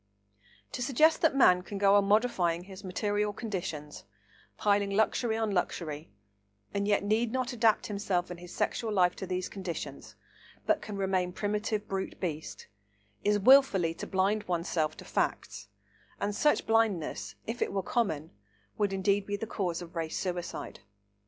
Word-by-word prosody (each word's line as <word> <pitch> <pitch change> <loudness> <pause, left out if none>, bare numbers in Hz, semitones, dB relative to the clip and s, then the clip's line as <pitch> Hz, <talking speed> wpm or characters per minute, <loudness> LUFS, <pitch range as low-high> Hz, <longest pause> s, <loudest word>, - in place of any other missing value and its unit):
To - - -5
suggest 300 +6 +3
that 320 -4 +3
man 180 -9 +6
can 200 +2 -7
go 200 0 +4
on 200 -1 +5
modifying 195 -6 +2
his 190 +1 -11
material 205 +3 -1
conditions, 175 -9 -5 0.5
piling 200 -1 +2
luxury 220 +2 +1
on 220 -2 0
luxury, 165 -4 -2 0.6
and 200 0 -1
yet 205 -1 +2
need 220 +3 +1
not 255 -1 -1
adapt 225 -2 +3
himself 195 -4 -1
and 175 - -7
his 175 0 -11
sexual 225 -2 -1
life 180 -3 +3
to 190 - -5
these 185 0 -2
conditions, 185 -4 -6 0.5
but - - +2
can 205 -2 -6
remain 190 -2 0
primitive 210 +1 -2
brute 190 0 -4
beast, 160 -4 -4 0.6
is 205 0 +3
wilfully 205 -7 +5
to - - -7
blind 200 +3 +1
oneself 165 -3 -1
to - - -10
facts, 105 - -2 0.5
and 205 0 -1
such 295 +6 +2
blindness, 180 - 0
if 230 +2 -5
it - - +1
were 195 -1 -1
common, 160 -11 -1 0.5
would 205 -2 +1
indeed 195 +1 +1
be 205 0 -2
the 225 - -4
cause 180 -6 -2
of 170 +1 -13
race 165 -1 -2
suicide. 175 -2 -4
200 Hz, 160 wpm, -30 LUFS, 180-215 Hz, 0.6 s, man